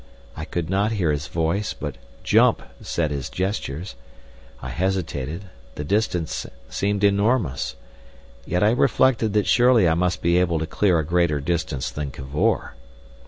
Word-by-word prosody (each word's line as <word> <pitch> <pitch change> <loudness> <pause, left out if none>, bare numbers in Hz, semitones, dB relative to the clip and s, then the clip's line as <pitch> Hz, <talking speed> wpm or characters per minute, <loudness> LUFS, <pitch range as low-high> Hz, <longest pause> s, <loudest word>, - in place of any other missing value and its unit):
I 75 - -5
could 85 -1 -3
not 100 +4 +1
hear 90 -8 +1
his 75 0 -2
voice, 85 +5 -1
but - - -6 0.2
"jump" - - +4 0.2
said 80 -3 -1
his 70 -1 -3
gestures. 90 - -3 0.7
I - - -6
hesitated, 85 -2 -2 0.3
the 75 - -4
distance 90 -2 -1 0.2
seemed 100 +7 -1
enormous. 100 - +1 0.7
Yet 90 +7 0
I 105 - +5
reflected 120 -3 +2
that 105 -1 +2
surely 120 -6 +5
I 80 - +3
must 90 +2 0
be 85 +1 +4
able 85 -2 +1
to 80 - -1
clear 90 +1 +2
a 80 - 0
greater 85 -2 +1
distance 70 -3 -2
than 75 -1 -4
Cavor. 65 +2 -1
85 Hz, 150 wpm, -23 LUFS, 75-100 Hz, 0.7 s, I